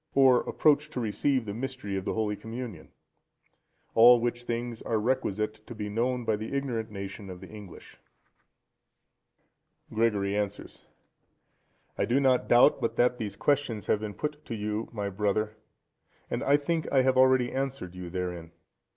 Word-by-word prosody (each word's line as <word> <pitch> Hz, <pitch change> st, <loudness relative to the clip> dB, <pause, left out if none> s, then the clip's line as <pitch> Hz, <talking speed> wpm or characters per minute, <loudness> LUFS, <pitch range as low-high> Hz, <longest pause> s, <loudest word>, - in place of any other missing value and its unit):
Or 130 Hz, -3 st, +6 dB
approach 150 Hz, 0 st, +3 dB
to 130 Hz, -, -5 dB
receive 125 Hz, +3 st, 0 dB
the 100 Hz, -, -4 dB
Mystery 130 Hz, -3 st, -4 dB
of 95 Hz, -1 st, -3 dB
the -, -, -2 dB
Holy 110 Hz, -2 st, 0 dB
Communion? 115 Hz, -6 st, -7 dB, 1.0 s
All 120 Hz, +2 st, +8 dB
which 120 Hz, +1 st, -2 dB
things 120 Hz, -1 st, -3 dB
are 115 Hz, -, -1 dB
requisite 110 Hz, -3 st, -1 dB
to 120 Hz, -, -8 dB
be 105 Hz, -1 st, -4 dB
known 120 Hz, +3 st, -1 dB
by 110 Hz, -2 st, +1 dB
the 110 Hz, +6 st, -5 dB
ignorant 120 Hz, -5 st, -2 dB
nation 100 Hz, -1 st, -7 dB
of 90 Hz, -1 st, -8 dB
the 95 Hz, -, -11 dB
English. 105 Hz, -5 st, -12 dB, 1.9 s
Gregory 105 Hz, -3 st, +1 dB
answers.—I 105 Hz, -1 st, -8 dB
do 125 Hz, +3 st, +2 dB
not 130 Hz, -2 st, +3 dB
doubt 120 Hz, +5 st, +5 dB
but 115 Hz, 0 st, -1 dB
that 125 Hz, +1 st, +2 dB
these 105 Hz, -3 st, -4 dB
questions 135 Hz, -5 st, 0 dB
have 105 Hz, -, +2 dB
been 105 Hz, -1 st, -5 dB
put 150 Hz, 0 st, -4 dB
to 115 Hz, -, -4 dB
you, 105 Hz, +1 st, -3 dB
my 105 Hz, -3 st, -3 dB
brother, 105 Hz, +2 st, -1 dB, 0.8 s
and -, -, -1 dB
I 140 Hz, +1 st, +4 dB
think 160 Hz, +2 st, -2 dB
I 135 Hz, -2 st, +4 dB
have 130 Hz, 0 st, +3 dB
already 130 Hz, -1 st, +4 dB
answered 135 Hz, -9 st, -3 dB
you 90 Hz, -1 st, -7 dB
therein. 90 Hz, -2 st, -5 dB
115 Hz, 160 wpm, -28 LUFS, 105-130 Hz, 1.9 s, All